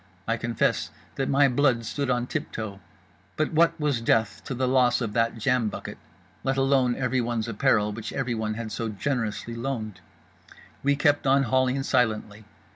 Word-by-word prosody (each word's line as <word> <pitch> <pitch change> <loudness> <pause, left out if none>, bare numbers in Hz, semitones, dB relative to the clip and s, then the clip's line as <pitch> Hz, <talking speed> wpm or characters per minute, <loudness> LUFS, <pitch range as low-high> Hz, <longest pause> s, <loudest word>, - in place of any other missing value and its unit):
I 115 - +2
confess 115 -1 0 0.2
that 135 - -2
my 140 +1 +5
blood 125 -3 +2
stood 140 +3 -2
on 125 -1 +1
tip - - -4
toe; 105 -3 -5 0.6
but 155 +1 0
what 165 +1 +3
was 145 -6 0
death 115 -1 +1
to 135 - -4
the 130 +1 0
loss 125 -1 +3
of 115 -4 -3
that 115 0 +1
jam 120 -1 +1
bucket, - - -7 0.4
let 135 0 0
alone 135 -2 +3
everyone's 120 -3 -1
apparel 105 -2 +2
which 110 +1 -6
everyone 115 -5 -2
had 115 -1 -5
so 115 +1 -3
generously 115 0 -2
loaned? 115 -4 -4 0.8
We 140 +1 +2
kept 145 0 +2
on 135 +1 +4
hauling 130 +2 +1
silently. 110 -4 0
120 Hz, 165 wpm, -26 LUFS, 115-135 Hz, 0.8 s, my